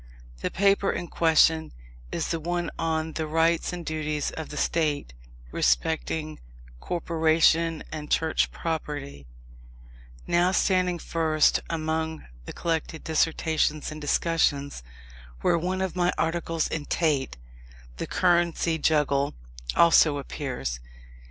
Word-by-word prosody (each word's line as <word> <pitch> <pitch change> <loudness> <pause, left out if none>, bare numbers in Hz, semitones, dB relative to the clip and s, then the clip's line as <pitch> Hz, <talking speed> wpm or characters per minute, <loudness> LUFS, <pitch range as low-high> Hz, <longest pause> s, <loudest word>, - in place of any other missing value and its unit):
The - - -2
paper 200 0 +2
in 175 - -5
question 160 -1 +3 0.4
is - - -2
the 165 - -1
one 175 +1 -2
on 160 -1 -1
the 160 -1 -3
rights 165 +1 +2
and 175 -1 -6
duties 155 -2 -2
of 160 - -7
the 150 - -7
State 150 - 0 0.4
respecting 155 - 0 0.4
Corporation 165 - +2
and 150 -1 -6
Church 160 -1 +1
Property, 145 - -5 1.0
now 175 +1 +3
standing 185 -2 +2
first 160 -2 +2
among 160 -1 -2 0.2
the - - -7
collected 160 -1 -3
Dissertations 160 -1 0
and 155 0 -8
Discussions; 145 - 0 0.6
where - - +3
one 185 +3 -2
of 190 - -3
my 180 0 +2
articles 165 -1 -1
in 155 -2 -4
Tait, 145 - 0 0.6
"The - - -4
Currency 170 -2 +2
Juggle," 145 -2 +1 0.4
also 165 -3 +5
appears. 125 - -4
160 Hz, 115 wpm, -26 LUFS, 150-170 Hz, 1.0 s, also